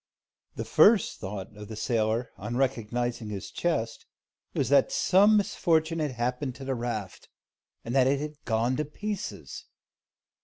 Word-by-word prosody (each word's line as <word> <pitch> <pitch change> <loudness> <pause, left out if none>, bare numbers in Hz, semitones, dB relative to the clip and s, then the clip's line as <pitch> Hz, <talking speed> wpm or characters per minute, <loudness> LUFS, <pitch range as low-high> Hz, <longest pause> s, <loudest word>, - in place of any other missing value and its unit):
The - - -4
first 210 -3 +4
thought 95 +1 -6
of 105 0 -9
the 110 - -7
sailor, 115 +1 0
on 110 +5 -4
recognising 120 -3 -1
his 100 -2 -6
chest, 175 -1 -2 0.5
was - - 0
that - - +4
some 210 - +5
misfortune 165 -5 +1
had 150 -4 -1
happened 125 +2 -2
to 135 - -9
the 135 - -1
raft, 115 -6 -5 0.6
and 115 - -4
that 130 -1 +4
it 140 +1 +2
had 150 0 -7
gone 115 +2 +1
to 150 - -1
pieces. 205 +7 -6
125 Hz, 150 wpm, -28 LUFS, 110-160 Hz, 0.6 s, some